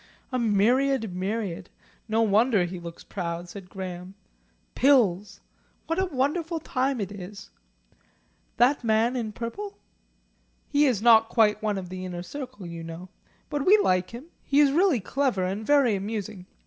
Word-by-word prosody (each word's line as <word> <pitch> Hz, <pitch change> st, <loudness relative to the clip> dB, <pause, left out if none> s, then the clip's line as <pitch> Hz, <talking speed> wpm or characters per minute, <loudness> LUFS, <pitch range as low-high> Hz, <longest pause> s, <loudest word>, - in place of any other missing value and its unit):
"A 255 Hz, -, 0 dB
myriad 230 Hz, +1 st, +2 dB
myriad. 190 Hz, -2 st, -3 dB, 0.4 s
No 225 Hz, +1 st, +2 dB
wonder 215 Hz, -2 st, +3 dB
he 180 Hz, +1 st, -6 dB
looks 170 Hz, -1 st, -9 dB
proud," 175 Hz, -2 st, -5 dB
said 180 Hz, +1 st, -10 dB
Graham. 185 Hz, 0 st, -7 dB, 0.6 s
"Pills! 205 Hz, -8 st, +2 dB, 0.4 s
What 330 Hz, +2 st, -1 dB
a -, -, +2 dB
wonderful 320 Hz, +4 st, -1 dB
time 265 Hz, -2 st, -1 dB
it 200 Hz, -2 st, -3 dB
is! 195 Hz, 0 st, -9 dB, 1.1 s
That 255 Hz, +3 st, +3 dB
man 225 Hz, +2 st, +2 dB
in 225 Hz, -4 st, -3 dB
purple?" 320 Hz, -, -6 dB, 0.9 s
"He 290 Hz, 0 st, +3 dB
is 225 Hz, -5 st, 0 dB
not 225 Hz, -1 st, +6 dB
quite 215 Hz, -3 st, +3 dB
one 210 Hz, -2 st, -1 dB
of 185 Hz, -2 st, -6 dB
the 185 Hz, 0 st, -6 dB
inner 175 Hz, -1 st, -5 dB
circle, 255 Hz, -1 st, -8 dB
you 170 Hz, -1 st, -7 dB
know. 165 Hz, +3 st, -8 dB, 0.4 s
But 290 Hz, -1 st, -2 dB
we 405 Hz, +6 st, +6 dB
like 185 Hz, -, +1 dB
him. 240 Hz, +5 st, -9 dB, 0.2 s
He 280 Hz, -, +1 dB
is 290 Hz, -2 st, +5 dB
really 330 Hz, -, +3 dB
clever 255 Hz, -3 st, 0 dB
and 195 Hz, +4 st, -2 dB
very 275 Hz, -2 st, +4 dB
amusing. 200 Hz, -2 st, -5 dB
220 Hz, 155 wpm, -26 LUFS, 185-265 Hz, 1.1 s, not